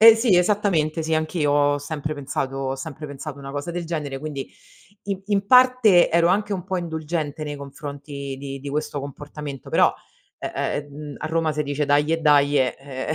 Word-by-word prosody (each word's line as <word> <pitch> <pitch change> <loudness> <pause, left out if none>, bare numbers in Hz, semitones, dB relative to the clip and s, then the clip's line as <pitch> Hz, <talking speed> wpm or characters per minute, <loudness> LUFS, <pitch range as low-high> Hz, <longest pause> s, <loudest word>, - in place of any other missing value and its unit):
Ehm, 225 0 +11
sì 225 -5 +3
esattamente. 175 -5 +2
Sì 160 0 0
anch'io 155 -1 0
ho 145 0 +3
sempre 150 +1 -4
pensato 135 -1 -3
ho 135 0 -2
sempre 150 +2 -7
pensato 145 +1 -7
una 135 0 -8
cosa 145 +4 -4
del 175 0 -3
genere 150 -5 -3
quindi 145 -2 -5 0.6
in 195 -1 -3
in 200 -1 +1
parte 250 -6 +6
ero 170 0 +4
anche 205 +3 +1
un 185 -3 -3
po' 190 0 -2
indulgente 160 -3 -3
nei 145 -1 -4
confronti 140 -1 -7
di 140 0 -6
di 140 - -6
questo 150 0 -2
comportamento 145 0 -7
però, - - +5 0.5
eh, - - -4 0.4
ehm, 145 0 -8
a - - -4
Roma 160 0 +1
se 150 0 -1
dice: 145 +1 -1
"Daje, 150 +3 +2
daje", 145 -3 +4
eh 135 +2 -4
150 Hz, 185 wpm, -23 LUFS, 140-170 Hz, 0.6 s, Ehm